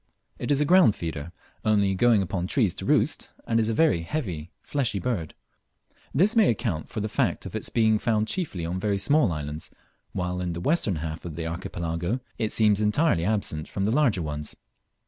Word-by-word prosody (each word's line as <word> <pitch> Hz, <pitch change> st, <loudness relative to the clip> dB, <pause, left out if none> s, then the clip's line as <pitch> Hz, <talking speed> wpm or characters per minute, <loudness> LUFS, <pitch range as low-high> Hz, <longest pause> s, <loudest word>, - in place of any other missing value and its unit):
It -, -, -4 dB
is 145 Hz, -1 st, +3 dB
a 150 Hz, -, +3 dB
ground 175 Hz, -, +6 dB
feeder, 80 Hz, -1 st, -5 dB, 0.3 s
only 100 Hz, -2 st, +3 dB
going 110 Hz, +1 st, +4 dB
upon 90 Hz, -1 st, -3 dB
trees 105 Hz, -5 st, +2 dB
to -, -, -7 dB
roost, -, -, +1 dB, 0.2 s
and 115 Hz, 0 st, +1 dB
is 110 Hz, 0 st, +1 dB
a -, -, +1 dB
very 155 Hz, -, +3 dB
heavy 85 Hz, -, -4 dB
fleshy 130 Hz, -8 st, -1 dB
bird. 100 Hz, -9 st, -3 dB, 0.8 s
This 195 Hz, -, +3 dB
may 220 Hz, -5 st, +5 dB
account 105 Hz, -, -2 dB
far 110 Hz, -, -4 dB
the 105 Hz, -, -1 dB
fact -, -, 0 dB
of -, -, -7 dB
its -, -, -3 dB
being 110 Hz, -2 st, +3 dB
found 110 Hz, -2 st, +1 dB
chiefly 110 Hz, -, -3 dB
on 90 Hz, +2 st, -2 dB
very 100 Hz, 0 st, 0 dB
small 145 Hz, -, +3 dB
islands, 75 Hz, 0 st, -4 dB, 0.4 s
while 90 Hz, -1 st, -2 dB
in 90 Hz, -1 st, -2 dB
the 85 Hz, -, -4 dB
western 110 Hz, -, +1 dB
half 80 Hz, +1 st, -5 dB
of 85 Hz, -3 st, -6 dB
the 85 Hz, 0 st, -4 dB
Archipelago, 85 Hz, +5 st, -3 dB, 0.2 s
it 110 Hz, -2 st, 0 dB
seems 105 Hz, -2 st, +3 dB
entirely 105 Hz, -, +2 dB
absent 100 Hz, -7 st, -1 dB
from 100 Hz, -, -2 dB
the 105 Hz, -, +1 dB
larger 120 Hz, -, +2 dB
ones. 75 Hz, -1 st, -5 dB
100 Hz, 195 wpm, -26 LUFS, 85-120 Hz, 0.8 s, ground